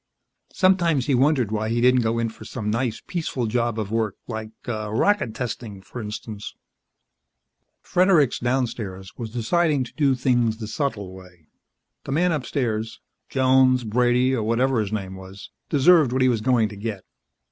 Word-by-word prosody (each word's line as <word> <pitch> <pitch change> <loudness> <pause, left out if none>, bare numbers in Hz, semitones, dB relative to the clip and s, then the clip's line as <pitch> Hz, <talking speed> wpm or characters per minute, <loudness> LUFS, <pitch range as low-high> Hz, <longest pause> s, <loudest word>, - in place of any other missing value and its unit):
Sometimes 175 -8 +3
he 140 - +1
wondered 130 -4 +2
why 110 0 -1
he 115 +1 0
didn't 125 +1 +4
go 115 0 0
in 115 -1 0
for 110 - -13
some 105 -1 -4
nice, 115 0 -2
peaceful 160 -8 -3
job 115 0 -1
of 105 -2 -3
work 110 -3 0
like 110 -2 -5 0.2
rocket 110 - 0
testing, 115 -5 -5
for 95 +6 -9
instance. 105 0 -7 1.3
Fredericks, 175 -8 +3
downstairs, 115 -7 -3
was 115 -2 -6
deciding 145 +5 +1
to 120 - -11
do 140 -4 +2
things 120 -3 +1
the 110 - -6
subtle 110 - -3
way. 90 -3 -15 0.6
The - - -5
man 175 +4 +2
upstairs 120 -6 -2 0.3
Jones, 130 -1 +4
Brady 125 +3 +2
or 120 - -1
whatever 115 +3 +1
his 105 -2 -2
name 100 -3 -4
was 95 0 -11 0.2
deserved 150 -1 +5
what 130 0 +2
he 130 - +4
was 115 -3 0
going 120 -2 +2
to 105 - -9
get. 100 -1 -5
120 Hz, 160 wpm, -23 LUFS, 110-130 Hz, 1.3 s, deserved